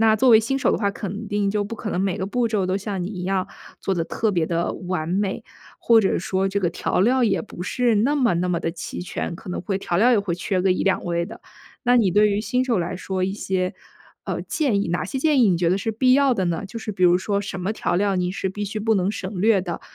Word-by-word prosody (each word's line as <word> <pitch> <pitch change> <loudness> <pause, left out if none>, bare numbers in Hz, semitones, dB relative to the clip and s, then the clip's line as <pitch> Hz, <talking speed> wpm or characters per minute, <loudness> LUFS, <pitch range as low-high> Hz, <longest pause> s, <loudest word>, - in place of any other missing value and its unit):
那 220 -1 +5
作 235 +4 +3
为 225 -2 +8
新 235 +5 -1
手 - - +2
的 - - +1
话 200 -2 +1
肯 205 +2 -6
定 205 -1 0
就 205 0 0
不 215 +3 -6
可 215 -1 -5
能 180 - -1
每 195 -2 0
个 190 - -3
步 240 +3 0
骤 215 -4 0
都 185 - 0
像 200 -2 -4
你 180 - -3
一 185 -4 -6
样 190 -1 -1 0.3
做 195 - -1
得 165 -2 -1
特 220 +4 -1
别 170 -4 0
地 170 0 -1
完 180 -3 -4
美， 195 +2 -1 0.4
或 230 -1 +5
者 195 - +1
说 190 +1 0
这 200 +1 -1
个 175 -2 +1
调 170 - -1
料 245 +5 +3
也 - - +1
不 180 -5 -8
是 235 +2 +1
那 250 +8 +2
么 255 -8 +2
那 180 +2 0
么 170 -1 0
地 165 - -1
齐 165 0 -7
全， 180 -1 -4
可 175 - -11
能 - - -3
会 195 +1 -2
调 175 -3 -2
料 235 +6 +5
也 210 - +4
会 180 -4 -2
缺 185 +1 -1
个 190 - +3
1-2 190 +1 0
味 170 0 -1
的。 - - -11 0.4
那 245 0 +4
你 205 -6 +3
对 210 +2 +5
于 205 0 0
新 250 +3 0
手 240 -5 +1
来 175 0 -2
说 190 0 -2
一 190 - -1
些， 190 -3 -2 0.5
呃， - - -3
建 255 -11 0
议 - - -2
哪 175 +1 -1
些 265 - -4
建 295 -1 +3
议 215 - +5
你 175 - +2
觉 170 -1 +2
得 185 - +2
是 210 +3 -2
必 255 +4 +3
要 275 -1 +4
的 190 -5 0
呢？ 170 +2 -2
就 215 +4 -7
是 220 -1 -5
比 185 - -4
如 180 0 +6
说， 200 +1 -1
什 195 -2 -5
么 195 +4 -1
调 175 - -1
料 200 0 +1
你 180 -1 0
是 190 0 -3
必 205 +2 -4
须 205 +2 -4
不 220 +1 +1
能 190 0 +1
省 190 -2 -5
略 210 -1 +4
的？ 175 -2 -5
195 Hz, 300 characters per minute, -23 LUFS, 180-220 Hz, 0.5 s, 为